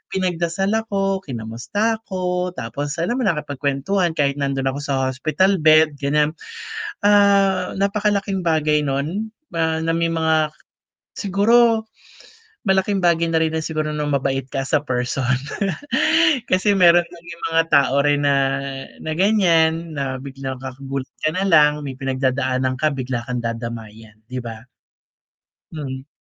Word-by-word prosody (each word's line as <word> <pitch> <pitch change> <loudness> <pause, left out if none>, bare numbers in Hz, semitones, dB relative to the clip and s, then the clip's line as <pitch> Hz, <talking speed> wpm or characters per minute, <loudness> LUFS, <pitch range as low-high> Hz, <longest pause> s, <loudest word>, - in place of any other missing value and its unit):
pinagdasal 180 +1 -1
ako, 195 -3 0
kinamusta 130 - -2
ko, 180 -1 -2
tapos 145 +4 -4
alam 235 +10 -1
mo - - 0
nakipag-kwentuhan 150 +3 -1
kahit 145 -1 0
nandoon 135 -1 0
ako 140 - -5
sa 140 -2 -1 0.2
hospital 180 +9 +1
bed 155 -1 +4
ganyan. 150 +2 +1 0.7
Ah, 200 -2 +4
napakalaking 200 -1 0
bagay 150 -2 +2
nun 165 +11 -3 0.2
na 160 -1 -1
na 165 - -1
may 165 0 +1
mga 160 -2 +1 0.6
siguro, 220 +3 +3 0.8
malaking 190 +1 +2
bagay 170 -1 +3
na 160 - +2
rin 160 0 -1
na 160 - -2
siguro 155 -1 -2
na 150 - -2
mabait 135 -1 0
ka 135 - -2
sa 150 -2 +2
person 125 0 -2 1.3
kasi 195 +3 +3
meron 175 -1 +6
naging 170 0 -12
mga 165 0 +4
tao 140 -1 +4
rin 145 0 +2
na 140 - +4 0.7
na 155 - -3
ganyan 170 -5 +2
na 135 -1 -2
bigla 135 -1 -6
kang 130 -1 -7
gugulat 135 -1 -4 0.2
ka 155 - +4
na 185 - 0
lang 150 -4 +5
may 135 -2 -5
pinagdadaanan 130 -1 0
ka 155 - +2
bigla 130 -3 -3
kang 125 -1 -3
dadamayan, 115 -2 -6
'di 125 +1 -5
ba? 115 -1 -8 1.1
Mhm. 135 -4 -6
155 Hz, 135 wpm, -21 LUFS, 135-185 Hz, 1.3 s, meron